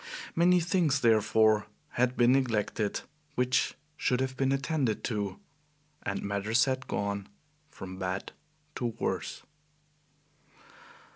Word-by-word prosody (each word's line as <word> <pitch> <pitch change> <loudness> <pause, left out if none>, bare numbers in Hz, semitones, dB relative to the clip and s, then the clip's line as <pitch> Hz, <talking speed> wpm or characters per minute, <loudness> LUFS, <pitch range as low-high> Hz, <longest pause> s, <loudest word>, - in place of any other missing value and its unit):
Many 180 +2 +5
things, 165 -5 +2
therefore, 110 -1 +4 0.2
had 125 +1 0
been 120 0 +5
neglected 110 -5 +1 0.3
which 125 0 +1 0.2
should 125 -4 +1
have 130 0 -1
been 135 0 +1
attended 135 -4 0
to, 100 -4 -2 0.6
and 100 0 -3
matters 100 +3 +2
had 130 -1 -2
gone 100 -1 -2 0.4
from 95 -6 -9
bad 95 0 -3 0.5
to 120 - -1
worse. - - -2
120 Hz, 110 wpm, -30 LUFS, 100-135 Hz, 0.6 s, Many